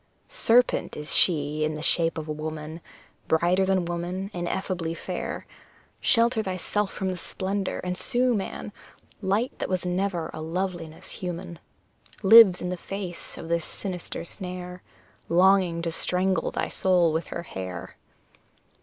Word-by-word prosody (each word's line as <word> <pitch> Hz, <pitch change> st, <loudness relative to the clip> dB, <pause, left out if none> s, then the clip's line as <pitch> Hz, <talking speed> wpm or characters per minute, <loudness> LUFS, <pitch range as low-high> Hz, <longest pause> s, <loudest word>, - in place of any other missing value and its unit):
Serpent 245 Hz, -, +3 dB
she 150 Hz, -2 st, +3 dB
is 155 Hz, -, +3 dB
in 155 Hz, -, -4 dB
the 150 Hz, -, -6 dB
shape 165 Hz, 0 st, +3 dB
of 155 Hz, -1 st, -4 dB
a -, -, -3 dB
woman, 155 Hz, +1 st, -5 dB, 0.5 s
Brighter 175 Hz, +4 st, +3 dB
than 190 Hz, -2 st, +2 dB
woman, 175 Hz, +3 st, -3 dB
ineffably 175 Hz, -1 st, -2 dB
fair! -, -, -5 dB, 0.5 s
Shelter 230 Hz, -1 st, +3 dB
thyself 195 Hz, +1 st, -1 dB
from 190 Hz, -2 st, -2 dB
the 185 Hz, -, -2 dB
splendour, 190 Hz, +2 st, -3 dB
and 180 Hz, 0 st, -2 dB
sue, 245 Hz, +6 st, +2 dB
man; 205 Hz, 0 st, -4 dB, 0.5 s
Light 205 Hz, +6 st, +1 dB
that -, -, -2 dB
was 185 Hz, -1 st, 0 dB
never 180 Hz, -2 st, -1 dB
a 155 Hz, -, -6 dB
loveliness 170 Hz, -1 st, -4 dB
human 175 Hz, -1 st, -6 dB, 0.6 s
Lives 200 Hz, -3 st, +9 dB
in 180 Hz, -, -2 dB
the 180 Hz, -, -3 dB
face 185 Hz, -1 st, -6 dB
of 165 Hz, -, -7 dB
this 170 Hz, 0 st, 0 dB
sinister 180 Hz, -2 st, -5 dB
snare, 180 Hz, 0 st, -5 dB, 0.5 s
Longing 180 Hz, -1 st, +4 dB
to 165 Hz, -, -1 dB
strangle 185 Hz, +3 st, +1 dB
thy -, -, -2 dB
soul 180 Hz, -4 st, +2 dB
with 160 Hz, +1 st, -1 dB
her 170 Hz, -, -5 dB
hair! 95 Hz, -, -7 dB
180 Hz, 145 wpm, -26 LUFS, 165-190 Hz, 0.6 s, Lives